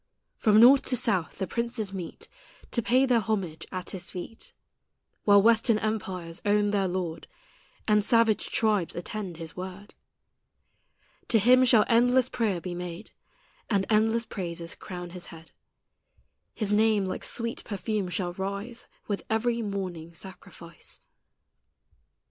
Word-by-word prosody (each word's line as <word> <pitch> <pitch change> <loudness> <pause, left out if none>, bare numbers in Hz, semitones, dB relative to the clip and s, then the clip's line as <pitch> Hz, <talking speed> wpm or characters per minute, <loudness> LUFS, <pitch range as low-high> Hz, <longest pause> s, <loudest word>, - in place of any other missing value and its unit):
From 215 -1 +5
north 260 +4 +8
to 250 - +2
south 200 -8 0
the 190 - -1
princes 235 0 -2
meet 180 -3 -6 0.4
To 235 - +1
pay 255 +4 +3
their 245 -3 +3
homage 190 -7 -3
at 185 -1 -5
His 185 -1 -7
feet, 185 +5 -8 0.7
While 200 -1 +6
western 230 0 +4
empires 190 -6 -3
own 205 0 +2
their 200 -2 +1
Lord, 175 -3 -4 0.6
And 210 -1 +4
savage 230 -1 +3
tribes 210 -6 +1
attend 180 0 -5
His 165 -1 -7
word. 190 +2 -8 1.3
To 230 - +4
Him 250 +4 +6
shall 230 -4 +5
endless 245 +2 +4
prayer 210 -7 0
be 180 +1 -5
made, 175 +3 -6 0.6
And 200 -4 +2
endless 225 +2 +3
praises 170 -4 -5
crown 180 -2 -8
His 180 0 -7
head; 165 0 -13 1.0
His 210 -2 -1
name 215 -1 +3
like 185 - -4
sweet 230 0 -2
perfume 205 -1 -3
shall 180 -1 -2
rise 200 +5 -5 0.2
With 205 -2 -2
every 230 +1 +1
morning 185 -6 -5
sacrifice. 175 -3 -10
205 Hz, 135 wpm, -27 LUFS, 180-225 Hz, 1.3 s, north